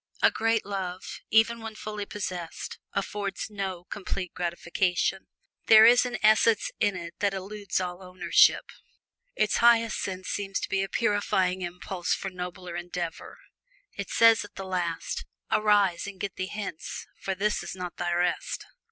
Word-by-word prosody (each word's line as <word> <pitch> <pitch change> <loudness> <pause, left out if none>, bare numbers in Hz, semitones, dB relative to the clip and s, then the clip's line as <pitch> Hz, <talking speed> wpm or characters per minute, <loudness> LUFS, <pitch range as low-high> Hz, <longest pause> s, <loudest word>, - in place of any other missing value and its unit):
A - - +7
great 225 0 +1
love, 190 -2 -5
even 225 +1 +4
when 225 -1 -7
fully 210 -1 -5
possessed, 180 -5 -5
affords 200 +1 -3
no 190 -4 -4
complete 185 -1 -5
gratification. 180 +2 -1 0.4
There 220 0 +9
is 245 +2 +6
an 240 -1 -3
essence 215 0 +4
in 205 - +2
it 170 -1 -6
that 200 -1 +1
eludes 200 +1 -3
all 180 0 -4
ownership. 180 -2 +3 0.6
Its 215 - +2
highest 230 -2 +4
use 185 -1 -6
seems 200 -1 -2
to - - -3
be 195 - +1
a 195 - -2
purifying 190 -4 +1
impulse 180 0 -2
for 195 - -5
nobler 180 -1 -6
endeavor. 175 -1 -5 0.6
It - - -5
says 230 -1 +5
at 205 - -13
the 195 - -6
last, 175 -3 -2 0.3
"Arise, 205 -4 +3
and 195 -2 -8
get 200 -2 -4
thee 185 - -3
hence, 200 -6 -6
for 195 - -2
this 210 +3 0
is - - -6
not 180 -2 -6
thy 175 0 -1
rest." 175 0 -1
195 Hz, 155 wpm, -27 LUFS, 180-210 Hz, 0.6 s, There